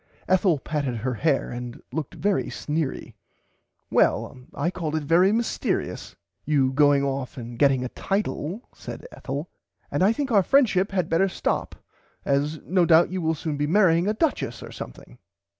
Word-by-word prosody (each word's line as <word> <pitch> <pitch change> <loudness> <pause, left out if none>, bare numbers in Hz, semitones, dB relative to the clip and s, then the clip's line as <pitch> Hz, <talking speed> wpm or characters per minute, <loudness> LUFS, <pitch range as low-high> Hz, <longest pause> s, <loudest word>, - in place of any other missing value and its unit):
Ethel 185 -3 +3
patted 140 -3 -2
her 125 +3 -2
hair 140 +5 0
and 120 0 -6
looked 155 -4 -4
very 200 -1 +1
sneery. 150 -2 -3 0.8
Well - - +2 0.2
I 170 - 0
call 160 -4 -3
it 155 - -1
very 175 +6 +4
mystearious 230 +1 -2 0.3
you 135 -3 +2
going 145 0 +4
off 135 -2 -3
and 120 -1 -8
getting 135 -3 +4
a - - -4
title 195 - -3
said - - -9
Ethel 145 +5 -5 0.4
and 145 - 0
I 195 +3 +5
think 270 +3 -2
our 205 -3 +6
friendship 205 -5 +3
had 185 -4 0
better 185 +4 +2
stop - - -2 0.5
as 145 +3 0
no 180 0 +2
doubt 170 +1 +5
you 185 -1 -2
will 160 0 +1
soon 150 -1 -3
be 145 0 0
marrying 175 0 +4
a 210 - +1
duchess 315 +6 -1
or - - -9
something. - - -10
160 Hz, 165 wpm, -25 LUFS, 140-190 Hz, 0.8 s, our